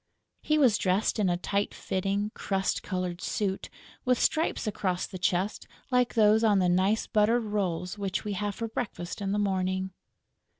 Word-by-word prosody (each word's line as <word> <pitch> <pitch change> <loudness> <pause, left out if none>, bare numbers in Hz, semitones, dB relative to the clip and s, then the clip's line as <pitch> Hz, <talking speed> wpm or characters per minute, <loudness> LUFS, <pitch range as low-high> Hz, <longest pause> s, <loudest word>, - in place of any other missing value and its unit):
He 305 - +1
was 255 -8 +4
dressed 190 +4 +1
in 200 -3 +3
a 175 - +1
tight 200 +3 -1
fitting 195 +2 -1
crust 195 -1 -1
coloured 180 -2 -3
suit, 195 -2 -2 0.3
with 250 -1 +3
stripes 315 -2 +1
across 190 -4 -1
the 185 - -8
chest 185 +3 0 0.2
like 250 -1 +2
those 220 0 +5
on 210 -3 +4
the 185 -2 +3
nice 190 +5 +2
buttered 225 +3 +2
rolls 195 -3 -2
which 195 -1 -2
we 210 - -2
have 205 +1 -2
for 230 - -3
breakfast 205 -5 -5
in 195 -1 -1
the 205 - 0
morning. 190 -1 0
200 Hz, 170 wpm, -28 LUFS, 185-215 Hz, 0.3 s, those